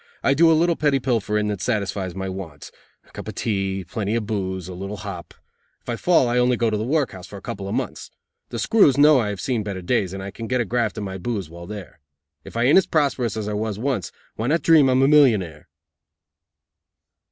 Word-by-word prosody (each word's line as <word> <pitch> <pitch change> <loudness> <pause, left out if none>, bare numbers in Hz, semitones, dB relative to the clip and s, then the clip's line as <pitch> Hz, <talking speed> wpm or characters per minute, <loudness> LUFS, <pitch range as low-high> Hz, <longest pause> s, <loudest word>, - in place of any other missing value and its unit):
I 135 - +4
do 165 +3 +5
a 160 - +4
little 170 +1 +2
petty 145 -3 +1
pilfering 105 -4 0
that 100 -3 -3
satisfies 100 -5 -2
my 95 0 -4
wants 90 -7 -8 0.4
a - - -22
cup - - -9
of - - -6
tea, 95 -3 -2
plenty 105 +3 -2
of 115 -2 -1
booze, 95 -4 -3
and 90 - -7
a - - -10
little 100 +2 -5
hop. 95 -4 -8 0.5
If - - -11
I 120 - -1
fall 165 0 +3
I 120 +1 +1
only 125 0 +3
go 115 -1 +1
to - - 0
the 105 - -2
workhouse 120 - -1
for 100 - -9
a - - -11
couple 100 0 -5
of - - -2
months. - - -4 0.4
The - - -5
screws 195 - +4
know 150 -1 +6
I 110 -4 -1
have 100 -2 -5
seen 120 0 -1
better 100 -3 -5
days 95 -2 0
and 95 0 -6
I 100 - -6
can 115 +3 -7
get 125 +1 0
a 120 - +1
graft 120 +2 -1
and 105 - -3
my 95 0 -6
booze 95 -5 -4
while 85 +1 -10
there. 105 -4 -9 0.4
If - - -9
I 115 - +2
aint 140 +9 +6
as 190 - -2
prosperous 135 -8 0
as 105 -1 -3
I 105 - -2
was 105 -1 -2
once, 120 - -2 0.3
why 110 - -2
not 165 +5 +1
dream 155 -5 +6
I'm 130 +1 +3
a - - +5
millionaire?" 110 - +3
110 Hz, 240 wpm, -22 LUFS, 95-130 Hz, 0.5 s, know